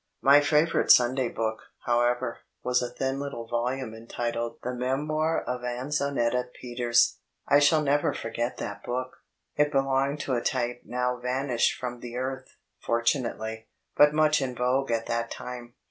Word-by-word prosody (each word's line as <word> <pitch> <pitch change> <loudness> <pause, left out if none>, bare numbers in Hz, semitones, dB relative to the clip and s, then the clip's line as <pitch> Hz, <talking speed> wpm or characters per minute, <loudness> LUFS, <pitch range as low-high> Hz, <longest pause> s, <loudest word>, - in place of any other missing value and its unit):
My 140 +1 +8
favourite 150 +3 +2
Sunday 125 0 +5
book, 110 -1 -2 0.3
however, 120 0 +1 0.2
was 125 0 +2
a 125 - -2
thin 135 +2 -2
litde 140 -5 -5
volume 125 +1 -1
eniided 115 +1 -4
The 125 - -2
Mtmoir 150 +6 -1
ofAnzenetta 125 0 -1
Peters. 120 -1 +2 0.3
I 145 - +6
shall 150 +2 +4
never 145 0 +2
forget 120 +2 -3
chat - - -5
book. 130 +1 -4 0.4
It 150 0 +3
belonged 135 +1 +1
to 135 - -2
a 120 - +1
type 120 -1 -1
now 125 0 -1
vanished 125 0 0
from 125 -1 -5
the 120 0 -8
earth 130 +1 -4 0.3
fortunately 115 -2 -1 0.3
but 145 0 +7
much 155 0 +3
in 130 -2 -3
vogue 125 +3 +1
at 115 -1 0
that 115 0 -2
time. 120 -1 -8
125 Hz, 145 wpm, -27 LUFS, 120-135 Hz, 0.4 s, My